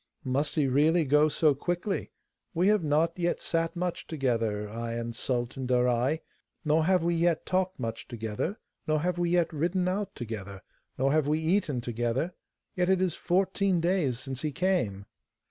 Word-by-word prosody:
'Must 140 +3 -1
he 150 - +3
really 155 +5 +3
go 150 +3 +4
so 150 0 +3
quickly? 175 +7 -2 0.4
We 180 +4 +3
have 210 -4 +3
not 160 +4 +1
yet 175 0 0
sat 165 +1 -1
much 175 0 -3
together, 115 -8 -1
I 115 +2 -4
and 115 0 -4
Sultan 125 +1 -2
Darai, 125 +4 +2 0.4
nor 155 +1 +3
have 185 -1 +3
we 170 0 +2
yet 170 -1 +1
talked 185 -1 0
much 115 -2 -4
together, 115 - -3 0.3
nor 155 -1 +2
have 175 +1 -1
we 175 -1 +1
yet 170 -1 +2
ridden 175 +4 0
out 200 +2 -2
together, 100 -5 -6 0.3
nor 135 +1 +2
have 155 -1 +2
we 150 +1 +2
eaten 160 -5 0
together; 120 +7 -1 0.4
yet 180 0 +1
it 190 -1 +4
is 185 -3 +1
fourteen 190 0 +1
days 170 -8 +1
since 130 -1 -5
he 155 - -1
came. 130 - 0
155 Hz, 170 wpm, -28 LUFS, 125-175 Hz, 0.4 s, go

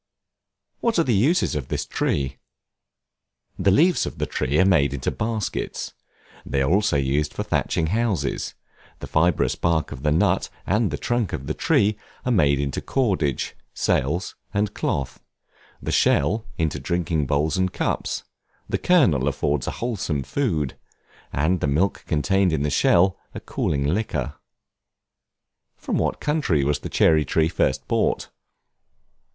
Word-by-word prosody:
What 230 -3 0
are 165 - +4
the 125 - +1
uses 135 - +2
of 70 -4 -3
this - - -2
Tree? 65 -1 -1 1.2
The 95 - +3
leaves 165 - +4
of - - -7
the - - -1
tree 70 +4 -1
are 95 - +5
made 70 -7 +3
into 65 - -2
baskets; 110 -2 -3 0.5
they 70 0 0
are 70 - +1
also 100 -4 +3
used 70 +2 0
for - - -2
thatching 80 - 0
houses: 95 - -1 0.4
the - - -7
fibrous 85 +1 +2
bark 85 -2 0
of 65 - -7
the 75 +1 +1
nut, 80 - +2 0.2
and 105 +2 +2
the - - -3
trunk 120 -6 -1
of 70 - -4
the - - -2
tree, 105 +1 +2 0.3
are 125 - +1
made 70 - +3
into 70 -1 -2
cordage, 95 - 0 0.2
sails, 80 +8 0 0.2
and 105 0 0
cloth; 70 -2 -2 0.6
the - - -2
shell, 105 +10 +2
into 80 -3 -1
drinking 85 -4 -1
bowls 75 +2 +1
and 95 -1 +1
cups; - - -2 0.4
the - - -1
kernel 90 - +3
affords 70 -1 0
a - - 0
wholesome 90 - -2
food, 80 - -1 0.6
and 80 +6 +1
the 75 - 0
milk 80 +8 0
contained 95 +4 +2
in 75 -3 0
the 75 - 0
shell, 95 +7 +3 0.2
a - - -4
cooling 70 -2 -1
liquor. 75 - -1 1.4
From - - -2
what - - -1
country 145 - +1
was 75 +1 +1
the - - -6
Cherry 80 -2 +4
Tree 80 +3 +2
first 65 -5 0
brought? - - 0
80 Hz, 150 wpm, -23 LUFS, 70-100 Hz, 1.4 s, are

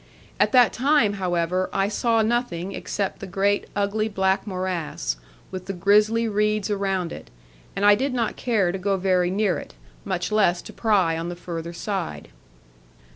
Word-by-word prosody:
At - - +3
that 250 -2 +6
time, 260 -4 +3
however, 180 +1 0
I 195 0 +1
saw 225 +2 +1
nothing 215 -6 -1
except 200 0 -3
the 195 - -7
great 200 +2 0
ugly 205 +2 0
black 190 0 0
morass, 180 - -3 0.3
with 185 -1 -6
the 195 - -2
grisly 210 +5 +3
reeds 210 -1 0
around 195 -4 -1
it; - - -10 0.5
and 200 - 0
I 205 - +8
did 265 +7 0
not 235 -3 -1
care 210 -8 +1
to 190 - -4
go 195 +1 0
very 180 -1 +2
near 195 -1 +1
it, - - -11 0.3
much 185 0 -2
less 195 -5 +2
to - - -10
pry 190 -8 +2
on 170 +1 -4
the 175 - -5
further 170 -1 -6
side. 175 - -4
195 Hz, 170 wpm, -24 LUFS, 180-215 Hz, 0.5 s, I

